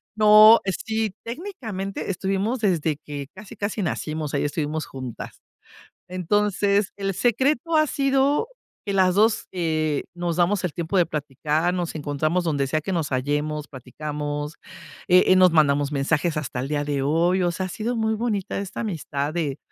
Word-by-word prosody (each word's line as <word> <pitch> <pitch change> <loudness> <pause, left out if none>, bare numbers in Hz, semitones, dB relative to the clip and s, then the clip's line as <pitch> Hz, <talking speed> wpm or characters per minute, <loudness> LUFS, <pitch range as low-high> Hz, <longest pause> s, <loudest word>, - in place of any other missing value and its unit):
No, 215 +1 +8
eh 195 - +1
sí, 220 -2 -1
técnicamente 230 - -5
estuvimos 195 +6 -1
desde 165 -7 +1
que 145 -2 -7
casi 205 +1 -11
casi 205 +1 -3
nacimos, 155 -3 -3
ahí 140 - +1
estuvimos 150 +1 -2
juntas. 130 -3 -8 0.7
Entonces 200 +2 +1
el 195 -1 -2
secreto 260 - +1
ha 310 -1 +4
sido, 275 +7 +2 0.4
que 200 - -1
las 185 -1 +3
2, 220 +2 +2
eh, 155 -4 -1
nos 175 -1 -2
damos 180 +3 +2
el 180 -4 -2
tiempo 170 +3 -3
de 175 -2 +4
platicar, 150 +3 -1
nos 175 -3 -3
encontramos 155 +4 -1
donde 145 -4 0
sea 155 +3 0
que 190 +5 -4
nos 165 -4 -1
hallemos, 145 +3 -2
platicamos, 145 +3 -5 0.5
eh 180 0 +6
eh, 185 - +6
nos 185 -1 +6
mandamos 145 -3 +3
mensajes 150 +3 0
hasta 145 -4 -3
el 130 - -4
día 145 0 -1
de 145 -2 -1
hoy. 170 +6 +2
O 175 - +2
sea, 185 +2 -3
ha - - -6
sido 225 +6 -3
muy 220 -1 +1
bonita 215 -4 -2
esta 200 -2 -6
amistad 155 -8 -3
de, 150 -5 -2
175 Hz, 165 wpm, -24 LUFS, 150-205 Hz, 0.7 s, No